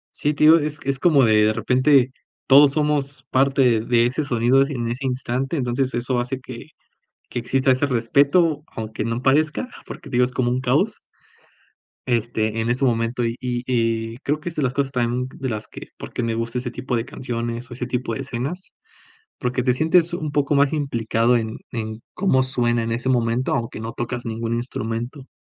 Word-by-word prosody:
Sí, 150 0 0
te 150 - 0
digo, 160 +2 +8
es 150 0 -2
es 135 -1 -1
como, 150 -7 +4
de 110 -1 +4
de 110 0 +3
repente, 130 +3 +3 0.3
todos 140 +1 +7
somos 150 -2 -1
parte 130 -3 +3
de 120 +1 +2
ese 130 +5 -1
sonido 125 0 +3
ese 140 +1 0
en 120 -2 -3
ese 130 +3 -3
instante, 130 +3 -2
entonces, 125 +1 0
eso 120 +1 0
hace 125 +2 -3
que 125 0 -10 0.6
que - - -3
exista 130 +3 +1
ese 130 +3 +3
respeto 140 +6 +2
aunque 110 -1 -5
no 115 +2 -2
parezca, 155 - +2 0.2
porque 145 -5 -9
te 120 - -2
digo 125 - +5
es 125 - -2
como 120 -1 0
un 125 +1 0
caos 125 -1 +1 1.1
este, 115 -2 0
en 115 +1 -1
ese 130 +3 0
momento. 115 0 0
Y 115 0 -1
y 125 -1 -3
y, 115 -2 -1
creo 145 +3 -2
que 175 - -5
es 165 - -9
de 150 - -1
las 125 -1 0
cosas 140 -1 -1
también, 125 0 -1
de 130 -2 -2
las 105 -2 -4
que - - -10
por - - -9
qué - - -2
me 115 -1 -1
gusta 115 +2 -3
ese 125 -1 -3
tipo 125 0 -3
de 115 - -2
canciones, 120 -2 -5
o - - -5
ese 125 0 -4
tipo 125 -2 -2
de 135 - -4
escenas, 135 +8 -5 0.6
porque 125 0 -1
te 125 -1 +3
sientes 165 +4 +3
un 155 -4 -3
poco 145 0 +1
más 140 +1 +3
implicado 120 -4 +1
en 110 0 -4
en 110 -2 -5
cómo 155 -9 +2
suena 120 -3 0
en 115 - -3
ese 120 +3 -2
momento, 120 0 +1
aunque 115 -2 -3
no 115 +1 -5
tocas 120 +1 -4
ningún 115 0 -3
instrumento. 120 +3 -4
125 Hz, 205 wpm, -22 LUFS, 115-135 Hz, 1.1 s, digo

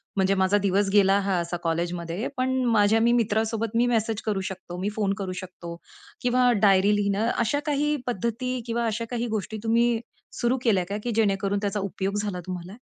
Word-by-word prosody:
म्हणजे 195 0 +2
माझा 190 +1 +3
दिवस 200 0 +1
गेला 195 -1 +5
हा 195 -1 0
असा 170 0 -3
कॉलेजमध्ये 170 +4 -2
पण 260 0 0
माझ्या 220 -1 +4
मी 235 +1 +4
मित्रासोबत 225 -1 0
मी 235 +1 +4
मेसेज 225 -2 0
करू 205 -3 0
शकतो, 185 -2 -7
मी 200 - 0
फोन 200 -3 0
करू 190 -2 -4
शकतो 175 -2 -9 0.5
किंवा 250 0 +3
डायरी 200 0 +5
लिहणं. 205 +2 0
अशा 235 +5 +1
काही 295 0 +1
पद्धती 245 +3 -2
किंवा 235 0 -1
अशा 230 +1 -2
काही 240 -1 -2
गोष्टी 215 +2 -5
तुम्ही 230 0 +2 0.4
सुरू 240 +2 +2
केल्या 200 -6 +3
का 200 - -2
की 240 - -2
जेणेकरून 200 -2 +1
त्याचा 205 0 -1
उपयोग 195 0 -3
झाला 200 -4 -3
तुम्हाला? 180 +1 -6
205 Hz, 180 wpm, -25 LUFS, 195-230 Hz, 0.5 s, गेला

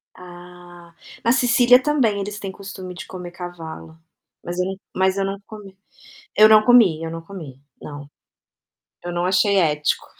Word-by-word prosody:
Ah. 175 -1 -14 0.3
Na 235 - +4
Sícilia 245 0 +4
também, 250 -9 +1
eles 205 +1 -5
têm 195 -2 -6
costume 190 -2 -9
de - - -9
comer 180 -2 -8
cavalo. 165 -2 -9 0.5
Mas 175 +1 -5
eu 180 - 0
não 190 0 -4 0.2
mas 190 0 +1
eu 195 - 0
não 195 +1 -4
comi, 200 -3 -12 0.6
eu 215 0 +8
não 215 -1 +7
comi, 215 -10 +5
eu 160 - -5
não 165 0 -6
comi, 165 -8 -10 0.2
não. 145 -1 -9 1.0
Eu 175 - -4
não 175 0 -2
achei 195 +2 +2
ético. 150 -4 +1
185 Hz, 165 wpm, -21 LUFS, 175-205 Hz, 1.0 s, eu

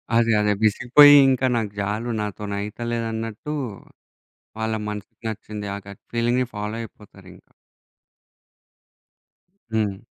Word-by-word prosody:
అదే. 115 0 +4
అదే. 105 0 +2
విసిగిపోయి 125 +7 +7
ఇంక 130 -1 +1
నాకు 110 -3 -1
జాలు 105 +4 -2
నాతో‌నయితల్లేదన్నట్టూ 110 +4 -4 1.1
వాళ్ళ 110 0 -1
మనసుకి 105 -1 -8
నచ్చింది, 105 -1 -6
ఆ - - -5
గట్ 100 - -11
ఫీలింగ్‌ని 120 +2 +1
ఫాలో 105 +1 -4
అయిపోతారింకా. 95 -4 -14 2.2
హ్మ్. 105 -3 0
110 Hz, 95 wpm, -23 LUFS, 105-115 Hz, 2.2 s, విసిగిపోయి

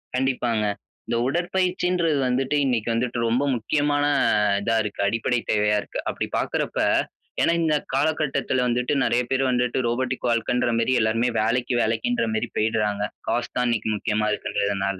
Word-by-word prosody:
கண்டிப்பாங்க. 125 -4 0 0.4
இந்த 115 - 0
உடற்பயிற்சின்றது 180 0 0
வந்துட்டு 130 +3 0
இன்னைக்கி 120 -4 0
வந்துட்டு 120 +1 -1
ரொம்ப 120 +4 +1
முக்கியமான 145 +5 0 0.6
இதா 115 +2 0
இருக்கு. 105 -1 -6
அடிப்படை 115 +3 0
தேவையா 105 0 +2
இருக்கு. - - -7
அப்படி - - -3
பார்க்கிறப்ப, - - -2 0.6
ஏன்னா 170 - +3
இந்த 155 -1 +2 0.2
காலகட்டத்துல 140 -3 0
வந்துட்டு, 125 +3 0
நெறைய 120 +1 +2
பேர் 130 0 +2
வந்துட்டு 125 +1 0
ரோபோடிக் 125 +1 -1
வாழ்க்கைன்ற 120 +1 +1
மேரி, 115 +3 +1
எல்லாருமே 115 +3 +1
வேலைக்கு, 120 +3 0
வேலைக்கின்ற 235 - 0
மேரி 220 - -2
போய்டுறாங்க. 105 -2 0 0.3
காசு 120 0 -1
தான் 125 - +2
இன்னைக்கி 110 -2 0
முக்கியமா 105 0 0
இருக்கறதுனால. 100 -2 -2
125 Hz, 140 wpm, -24 LUFS, 110-135 Hz, 0.6 s, ஏன்னா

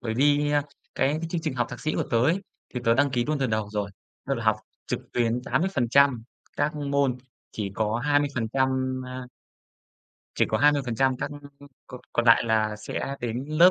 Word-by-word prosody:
Bởi 110 -3 -3
vì, 145 +3 +3
à, 145 -1 +3 0.3
cái 145 +4 +1
chương 170 - -1
trình 155 -4 -2
học 120 -2 0
thạc - - -7
sĩ 155 - -1
của - - +1
tớ 115 - +3
ấy 170 +7 +2 0.3
thì 125 - -2
tớ 115 0 +4
đăng 140 +1 +3
ký 120 -2 0
luôn 150 +1 -1
từ 135 - +1
đầu 110 -3 -1
rồi. 105 -1 -2 0.4
Tức - - +1
là - - -4
học - - +4 0.3
trực - - -2
tuyến 120 0 +1
80% 140 -8 +2 0.3
các 145 +1 0
môn, 140 -3 +1 0.4
chỉ 100 -3 -3
có 110 0 0
20%, 130 -2 +1
a 125 0 -6 1.1
chỉ - - +3
có - - +1
20% 135 -3 +3
các 135 - -3 0.6
cò 125 - -9
còn 120 - +1
lại 115 - +7
là 110 -1 +1
sẽ 135 +5 -4
đến 120 +2 -3
lớp, 170 +4 +7
130 Hz, 190 wpm, -26 LUFS, 115-145 Hz, 1.1 s, lại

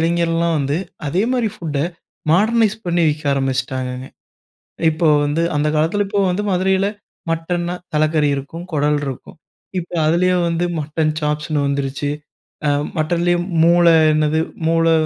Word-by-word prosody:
இளைஞர்கள்லாம் 170 0 +1
வந்து, 140 +2 0 0.3
அதேமாதிரி 225 - +1
ஃபுட்டை, 150 -5 -2 0.5
மாடர்னைஸ் 215 +3 +3
பண்ணி 175 0 +1
விக்க 150 0 -3
ஆரம்பிச்சுட்டாங்கங்க. 130 -1 -2 0.8
இப்போ 160 +1 +1 0.2
வந்து, 150 +3 0
அந்த 150 +1 +1
காலத்தில, 185 +7 +1
இப்போ 200 0 +1
வந்து 205 +3 -1
மதுரையில 190 +1 +2 0.4
மட்டன்னா, 175 +2 -2 0.2
தலக்கறி 155 -1 +2
இருக்கும், 165 +5 -7
குடல் 150 0 +2
இருக்கும். 135 +2 -7 0.4
இப்போ, 175 +1 -9
அதுலயே 180 +3 +3
வந்து 170 +1 0 0.2
மட்டன் 155 +1 -1
சாப்ஸ்ன்னு 150 -1 -1
வந்துருச்சு. 140 +1 -2 0.9
மட்டன்லேயும் 175 +2 +1 0.2
மூளை 170 0 +5 0.2
என்னது 155 +1 +1 0.3
மூளை 165 0 +3
165 Hz, 120 wpm, -19 LUFS, 150-175 Hz, 0.9 s, மூளை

